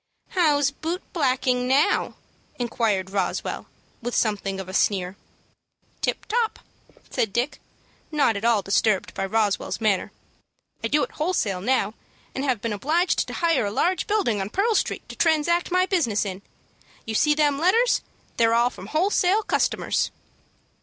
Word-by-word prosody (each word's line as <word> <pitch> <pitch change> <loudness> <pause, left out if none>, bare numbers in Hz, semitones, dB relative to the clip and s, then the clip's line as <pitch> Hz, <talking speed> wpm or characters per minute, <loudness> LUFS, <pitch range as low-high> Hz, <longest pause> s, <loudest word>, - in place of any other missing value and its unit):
"How's 290 -6 +3
boot 330 +5 -4
blacking, 255 -5 +1
now?" 270 +3 +2 0.4
inquired 220 -6 -1
Roswell, 195 -3 -2 0.3
with 240 +1 -3
something 200 -3 0
of 190 - -6
a 185 - -8
sneer. 190 -2 +1 0.9
"Tip - - -1
top," 455 0 0 0.5
said 220 - 0
Dick, 240 +7 -2 0.5
not 285 -7 +2
at 200 - -4
all 230 -4 +3
disturbed 195 0 +1
by 195 - -2
Roswell's 210 -1 0
manner. 210 -4 +1 0.7
"I - - +1
do 295 +5 +2
it - - -4
wholesale 220 - 0
now, 215 -2 +1 0.4
and 265 - -3
have 255 -7 0
been 230 -2 -1
obliged 320 - +1
to - - -6
hire 330 -10 +1
a - - -3
large 355 - 0
building 390 - +1
on 190 - -3
Pearl 415 - +1
Street 415 - -1
to - - -8
transact 335 +1 +2
my 365 +1 +3
business 285 - +1
in. 190 -1 -5 0.6
You 220 - -4
see 300 +7 +3
them 295 -2 +2
letters? 455 +9 +3 0.4
They're 230 -1 +4
all 240 +1 +3
from - - -10
wholesale 375 +4 +2
customers." - - 0
250 Hz, 155 wpm, -24 LUFS, 210-335 Hz, 0.9 s, They're